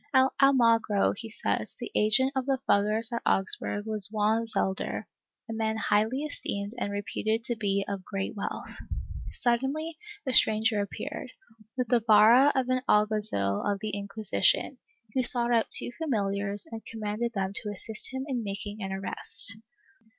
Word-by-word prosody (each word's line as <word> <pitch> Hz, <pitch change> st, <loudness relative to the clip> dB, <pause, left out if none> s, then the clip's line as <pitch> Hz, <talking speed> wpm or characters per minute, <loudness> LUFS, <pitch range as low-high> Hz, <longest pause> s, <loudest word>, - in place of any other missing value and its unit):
At 260 Hz, 0 st, +5 dB
Almagro, 230 Hz, -6 st, +3 dB
he 225 Hz, +2 st, -5 dB
says, 220 Hz, -, 0 dB
the -, -, -6 dB
agent 215 Hz, +5 st, +3 dB
of 265 Hz, 0 st, -2 dB
the 270 Hz, -1 st, +2 dB
Fuggers 215 Hz, +3 st, +1 dB
of 235 Hz, -, -2 dB
Augsburg 200 Hz, +2 st, +1 dB
was 215 Hz, -2 st, +5 dB
Juan 220 Hz, +1 st, +1 dB
Xelder, 190 Hz, -3 st, -2 dB, 0.4 s
a 225 Hz, -, -5 dB
man 220 Hz, 0 st, -1 dB
highly 220 Hz, +6 st, +1 dB
esteemed 200 Hz, -8 st, -4 dB
and 200 Hz, -, -2 dB
reputed 215 Hz, +2 st, -2 dB
to 240 Hz, -, -1 dB
be 200 Hz, -3 st, -1 dB
of 200 Hz, -2 st, -4 dB
great 195 Hz, +3 st, -4 dB
wealth. 200 Hz, -, -5 dB, 0.5 s
Suddenly 270 Hz, +7 st, -1 dB, 0.3 s
a 260 Hz, -, -1 dB
stranger 220 Hz, -2 st, +4 dB
appeared, 200 Hz, -, -6 dB, 0.4 s
with 250 Hz, -3 st, -1 dB
the 245 Hz, -1 st, +4 dB
vara 225 Hz, +5 st, +6 dB
of 260 Hz, -2 st, +1 dB
an 255 Hz, 0 st, +1 dB
alguazil 210 Hz, -, +1 dB
of 205 Hz, -1 st, 0 dB
the 215 Hz, 0 st, -4 dB
Inquisition, 205 Hz, -, 0 dB, 0.3 s
who 260 Hz, -, +2 dB
sought 240 Hz, -1 st, +5 dB
out 230 Hz, -1 st, +2 dB
two -, -, +2 dB
familiars 200 Hz, -8 st, -2 dB
and 225 Hz, -1 st, -7 dB
commanded 225 Hz, +1 st, -4 dB
them 190 Hz, 0 st, -2 dB
to 210 Hz, -, -5 dB
assist 215 Hz, +3 st, -2 dB
him 265 Hz, 0 st, -4 dB
in 250 Hz, -4 st, -2 dB
making 205 Hz, +1 st, -5 dB
an 195 Hz, -1 st, -4 dB
arrest. 195 Hz, +1 st, 0 dB
220 Hz, 160 wpm, -28 LUFS, 205-240 Hz, 0.5 s, vara